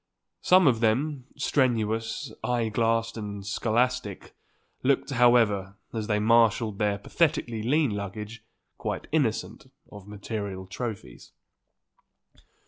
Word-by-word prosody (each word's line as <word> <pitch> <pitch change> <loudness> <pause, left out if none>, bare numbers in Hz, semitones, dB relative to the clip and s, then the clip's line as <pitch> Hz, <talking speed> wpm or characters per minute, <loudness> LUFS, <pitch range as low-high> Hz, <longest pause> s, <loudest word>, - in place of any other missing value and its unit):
Some 185 0 +5
of 125 -5 +4
them, 130 +5 0
strenuous, 115 -2 0
eye 120 -1 0
glassed 115 +1 0
and 100 -2 -6
scholastic, 115 0 -1 0.5
looked, 140 +2 +1
however, 115 -6 +3 0.2
as 110 -2 -3
they 105 - +1
marshalled 110 -1 +3
their 105 -1 +1
pathetically 120 - 0
lean 140 +3 +2
luggage, 105 +3 -6 0.4
quite - - -3
innocent 120 -5 -1 0.2
of 100 -2 -11
material 100 -2 -5
trophies. 95 - -7
115 Hz, 105 wpm, -27 LUFS, 105-125 Hz, 0.5 s, Some